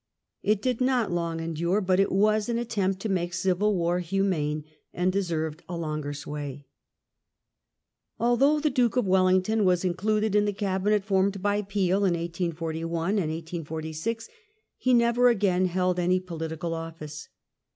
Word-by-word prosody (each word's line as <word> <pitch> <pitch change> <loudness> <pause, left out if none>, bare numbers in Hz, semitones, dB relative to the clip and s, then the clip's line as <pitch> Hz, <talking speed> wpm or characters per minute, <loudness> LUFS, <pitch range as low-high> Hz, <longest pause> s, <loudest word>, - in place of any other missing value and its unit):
It 210 0 +1
did 255 -1 0
not 255 -6 +2
long 170 -1 -1
endure^ 170 +5 -1
but 185 0 +3
it 195 - +3
was 210 +3 +2
an 235 - 0
attempt 200 -5 -1
to 220 - -2
make 175 -2 -1
dyil 185 +3 +1
war 175 -2 +1
humane, 170 -5 -1 0.3
and 180 +1 0
deserved 165 -4 -2
a 175 - -3
longer 155 -3 -3
sway. 145 -1 -6 1.5
Although 270 +6 +3
the 300 0 +1
Duke 250 -2 +2
of 250 - +2
Wellington 185 +3 +3
was 180 -1 +2
included 210 +4 0
in 210 0 +4
the 205 - 0
Cabinet 200 +1 0
formed 195 -1 +1
by 205 0 +1
Peel 195 -2 0
in 195 -3 +2
1841 165 0 -3
and 210 - +1
1846, 160 +6 -4 0.5
he 255 - 0
never 235 +1 +4
again 190 -5 +2
held 180 0 0
any 180 +1 +2
political 165 -2 -4
office. 160 -2 -7
185 Hz, 150 wpm, -27 LUFS, 165-210 Hz, 1.5 s, in